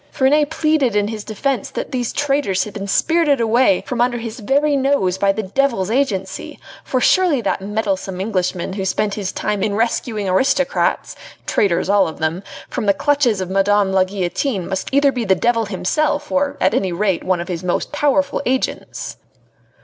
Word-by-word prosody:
Ferney 295 +2 +3
pleaded 310 -6 +1
in 205 0 +1
his 220 -2 -5
defence 235 +2 -2
that - - -5
these 245 -3 -2
traitors 275 -10 0
had 210 - -8
been 200 0 -5
spirited 315 - +2
away 240 +6 +3
from 245 -3 -2
under 245 0 +1
his 230 0 -6
very 285 +6 +1
nose 265 -10 +1
by 200 0 +3
the 220 +2 -3
devil's 220 -2 0
agency, 210 -8 -2 0.2
for 255 - -1
surely 350 +1 +3
that 200 -4 -1
meddlesome 195 -2 -2
Englishman 185 -3 -2
who 195 -1 -3
spent 205 +2 0
his 200 -3 -3
time 210 -2 -2
in 205 0 0
rescuing 225 -2 -1
aristocrats 270 - +1 0.3
traitors, 185 -5 +1
all 200 0 +3
of 160 - -7
them 160 +3 -2 0.3
from 210 - -4
the 200 - +4
clutches 270 -6 +1
of 185 0 -4
Madame 195 0 +2
la 190 -1 +4
Guillotine 190 +2 -2
must 190 -1 -3
be 270 - 0
either 280 -1 +4
the 230 -7 +1
devil 230 +3 +1
himself, 290 +10 -1
or 280 0 0
at 190 +2 +2
any 195 -7 0
rate 190 +1 0
one 185 -1 0
of 170 - -5
his 175 -2 -4
most 180 - -1
powerful 285 -1 +1
agents. 260 0 -3
215 Hz, 180 wpm, -19 LUFS, 190-275 Hz, 0.3 s, the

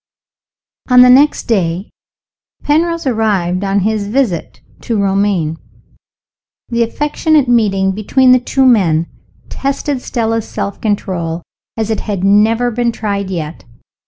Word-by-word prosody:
ON 250 0 +7
the 250 - +6
next 285 +4 +4
day 185 -3 -1 0.7
Penrose 335 +2 0
arrived 200 -7 0
on 195 0 0
his 210 0 -1
visit 215 - -2 0.2
to 230 - -2
Romayne. 195 -5 0 1.1
The 235 -1 -1
affectionate 295 +4 +1
meeting 200 -5 +2
between 250 +6 +2
the 255 - +6
two 265 +2 0
men 175 -10 +3 0.4
tested 275 0 -3
Stella's 225 -3 -2
self 200 - -5
control 175 -6 -2 0.3
as 220 0 -2
it 220 - -1
had 200 -4 -4
never 220 +5 +3
been 235 +1 0
tried 200 -3 -3
yet. 165 -3 -5
215 Hz, 125 wpm, -14 LUFS, 195-250 Hz, 1.1 s, ON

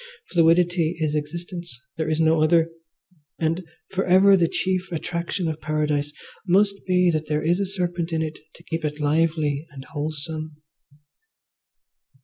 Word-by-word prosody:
Fluidity 170 0 +3
is 155 -2 0
existence, 170 -1 -5 0.2
there 160 -1 -2
is 155 0 0
no 160 -1 +4
other, 165 +1 +3 0.7
and 165 +3 0 0.3
for 190 0 0
ever 190 +2 +6
the 175 -3 +3
chief 185 +1 -1
attraction 170 +2 -2
of 155 -1 -3
Paradise 150 -1 0 0.4
must 200 +2 +3
be 180 -1 +4
that 155 -1 -2
there 150 0 0
is 175 +4 +2
a 200 - 0
serpent 175 -3 -2
in 160 -1 0
it 155 0 -5 0.2
to - - -16
keep 165 0 -4
it 150 0 -3
lively 155 0 +1
and 135 -3 -10
wholesome. 155 +1 -5
165 Hz, 145 wpm, -24 LUFS, 155-175 Hz, 0.7 s, ever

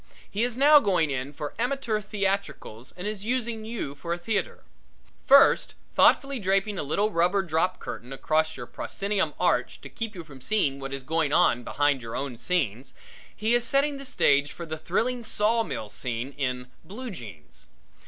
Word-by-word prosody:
He 205 - -3
is 245 0 0
now 295 +2 +8
going 180 - +1
in 135 +1 -3
for 145 0 -6
amateur 240 -3 0
theatricals 195 - -3
and 180 - -6
is 210 -2 -3
using 235 -2 -2
you 220 -11 -4
for 170 +4 -4
a - - -3
theatre. 210 +5 -2 0.6
First 275 +1 +6 0.2
thoughtfully 275 -2 +4
draping 195 +1 0
a - - 0
little 200 +9 0
rubber 180 +3 +2
drop 170 +2 0
curtain 125 +3 -8
across 155 +3 0
your 120 - -6
proscenium 200 - -2
arch 180 - +1
to - - -9
keep 225 -2 -5
you 175 - -7
from 135 -4 -14
seeing 140 -6 0
what 135 0 -6
is 135 -1 -5
going 160 +1 0
on 125 -7 +3
behind 145 +1 +1
your 115 -1 -6
own 135 -4 -4
scenes, 135 - -1 0.4
he 220 +3 0
is 240 -1 +3
setting 275 +3 +1
the - - -7
stage 145 - +2
for 170 - -7
the 160 -1 -4
thrilling 235 +9 -1
sawmill 220 - 0
scene 120 +4 -4
in 125 -2 -3
Blue 225 +9 -7
Jeans. 100 - -11
180 Hz, 175 wpm, -26 LUFS, 140-220 Hz, 0.6 s, now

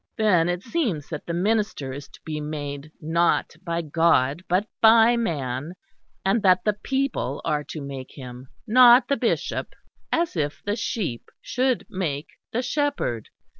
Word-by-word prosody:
Then 180 -6 +3
it 175 +1 -2
seems 230 - -2
that 155 -3 -6
the 170 - -2
minister 200 -8 0
is 140 +1 -8
to - - -17
be 155 -1 -4
made 145 -1 -5
not 165 +2 +1
by 170 -1 -2
God 155 -2 +2
but 185 +5 +2
by 225 +1 +7
man 150 - -2 0.5
that 190 -3 +3
the 210 - +2
people 265 - -2
are 150 -2 0
to 155 - -7
make 135 -2 -7
him, 125 -1 -10 0.2
not 245 +1 +7
the 280 - +3
bishop - - -1 0.4
(as 335 - 0
if 145 -3 -2
the 205 +1 0
sheep 190 - -3
should 255 -1 0
make 155 -6 -3 0.2
the 245 +3 -1
shepherd). 280 - -1
170 Hz, 150 wpm, -24 LUFS, 145-225 Hz, 0.5 s, by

